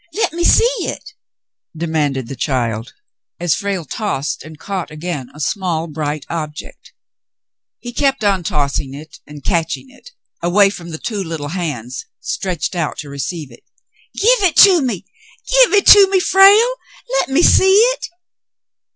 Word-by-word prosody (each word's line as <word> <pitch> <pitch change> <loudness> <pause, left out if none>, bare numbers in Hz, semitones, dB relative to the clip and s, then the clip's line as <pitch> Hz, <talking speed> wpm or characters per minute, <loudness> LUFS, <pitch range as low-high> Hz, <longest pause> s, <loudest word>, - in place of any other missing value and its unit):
Let 430 - -1
me 345 +1 -2
see - - +5 0.2
it," - - -5 0.7
demanded 150 -6 -2
the 135 - -7
child, 120 -5 -3 0.4
as 175 -2 +1
Frale 200 -5 -3
tossed 180 - -3
and 155 0 -12
caught 190 +1 -5
again 150 -4 -6
a - - -12
small, 170 -1 -2
bright 150 -2 -4
object. 155 -2 -7 0.9
He 240 0 -9
kept 270 -2 0
on 200 -3 +2
tossing 140 -3 -2
it 155 +2 -12
and 150 -1 -12
catching 170 - -2
it 280 - -17 0.3
away 195 +4 +3
from 170 -4 -9
the 160 - -6
two 205 +2 -4
little 160 -4 -5
hands 140 -9 -5
stretched 180 -3 -3
out 165 -4 -2
to 150 -1 -7
receive 140 0 -5
it. 120 - -17 0.5
"Give 475 +2 +3
it - - -12
to 370 -5 +3
me. 225 -8 -3 0.4
Give - - +4
it 405 -1 +4
to 400 -2 +9
me, 385 -1 +2
Frale. 400 +6 +5 0.5
Let - - -1
me 285 +6 +2
see 380 - +5
it." - - +3
170 Hz, 155 wpm, -17 LUFS, -, 0.9 s, to